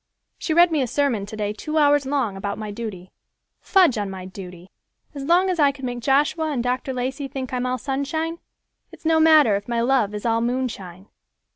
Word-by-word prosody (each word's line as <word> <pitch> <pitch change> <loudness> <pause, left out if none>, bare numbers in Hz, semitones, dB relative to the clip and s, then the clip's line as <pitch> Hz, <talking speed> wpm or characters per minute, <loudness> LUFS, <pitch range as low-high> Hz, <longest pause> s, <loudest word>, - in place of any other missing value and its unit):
She 315 - -1
read 345 0 +6
me 305 -3 +1
a 255 - 0
sermon 240 -7 0
today 210 -1 -3
two 305 +8 -4
hours 290 -2 +4
long 265 -8 -1
about 200 +1 -4
my 215 -1 -5
duty. 205 -5 -7 0.5
Fudge 355 - +3
on 205 -1 -3
my 190 -1 -7
duty! 185 -1 -10 0.4
As 280 -2 -6
long 350 +4 +4
as 365 -3 -1
I 285 -2 +5
can 270 -1 -8
make 245 -1 -4
Joshua 290 +5 +1
and 250 -5 -1
Dr. 250 +2 -2
Lacey 260 +2 -3
think 260 -1 -6
I'm 250 0 -1
all 255 0 -1
sunshine, 290 +6 -3 0.5
it's - - -16
no 320 0 +3
matter 310 -9 +6
if 200 +1 -4
my 235 -1 -1
love 235 -4 +1
is 210 - -6
all 230 0 +2
moonshine." 225 -7 -3
255 Hz, 205 wpm, -23 LUFS, 210-290 Hz, 0.5 s, read